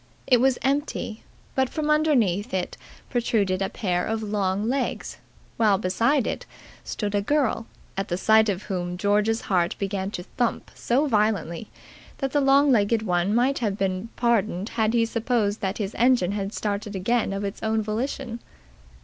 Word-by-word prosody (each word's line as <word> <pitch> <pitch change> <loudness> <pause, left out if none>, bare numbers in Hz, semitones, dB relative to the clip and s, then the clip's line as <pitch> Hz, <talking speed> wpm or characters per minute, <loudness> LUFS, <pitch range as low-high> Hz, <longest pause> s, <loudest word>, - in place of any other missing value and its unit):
It 250 -3 +4
was 265 -1 +3
empty, 270 -5 -1 0.3
but 265 -1 +1
from 305 -1 -1
underneath 245 - +2
it 180 -1 -2 0.4
protruded 210 -6 +1
a 195 - 0
pair 180 -5 -1
of 220 0 -2
long 205 0 -1
legs, 260 +2 -2 0.4
while 215 -4 +4
beside 225 +8 +1
it - - -4 0.4
stood 210 -2 -3
a 205 - +2
girl, 240 -2 0 0.3
at 195 +1 -2
the 175 - -1
sight 220 +3 +4
of 195 0 -2
whom 180 -2 -3
George's 210 +3 +2
heart 175 -3 +1
began 195 -1 -2
to 180 -3 -5
thump 240 +5 -2
so 265 +5 +1
violently 210 - 0 0.5
that 270 -2 -2
the 290 - +2
long 275 +1 +5
legged 220 -1 +3
one 180 +1 +1
might 255 +4 +2
have 210 -5 -1
been 195 +2 -2
pardoned 220 -5 +1
had 220 0 0
he 230 -1 +4
supposed 230 -2 0
that 195 -1 -2
his 205 -2 -3
engine 240 -6 +3
had 200 -1 -3
started 210 -1 -3
again 220 +4 +1
of 195 +1 -3
its 200 0 -4
own 220 0 0
volition. 235 +2 -3
215 Hz, 165 wpm, -25 LUFS, 195-240 Hz, 0.5 s, long